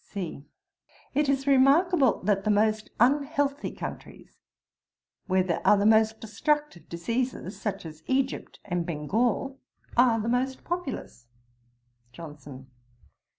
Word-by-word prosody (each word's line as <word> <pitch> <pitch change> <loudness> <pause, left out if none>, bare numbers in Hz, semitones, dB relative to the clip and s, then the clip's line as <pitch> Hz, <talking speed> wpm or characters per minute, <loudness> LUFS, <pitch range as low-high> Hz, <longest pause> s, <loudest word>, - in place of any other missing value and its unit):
C. 180 -8 -6 0.7
'It 290 +1 +1
is 270 -1 +1
remarkable 280 - +4
that 195 0 +1
the 215 - -1
most 215 +1 +2
unhealthy 285 +3 +1
countries, - - -9 0.9
where 185 -1 +2
there 175 -2 -2
are 210 - +5
the 200 - +1
most 220 0 +4
destructive 295 - -2
diseases, 230 +3 -3
such 210 -5 -3
as 155 -1 -10
Egypt 260 0 -1
and 175 -3 -1
Bengal, 220 - -1 0.4
are 235 -2 +4
the 220 - -3
most 255 +2 -1
populous.' 300 - -5 0.9
JOHNSON. 145 -4 -10
225 Hz, 115 wpm, -27 LUFS, 185-270 Hz, 0.9 s, are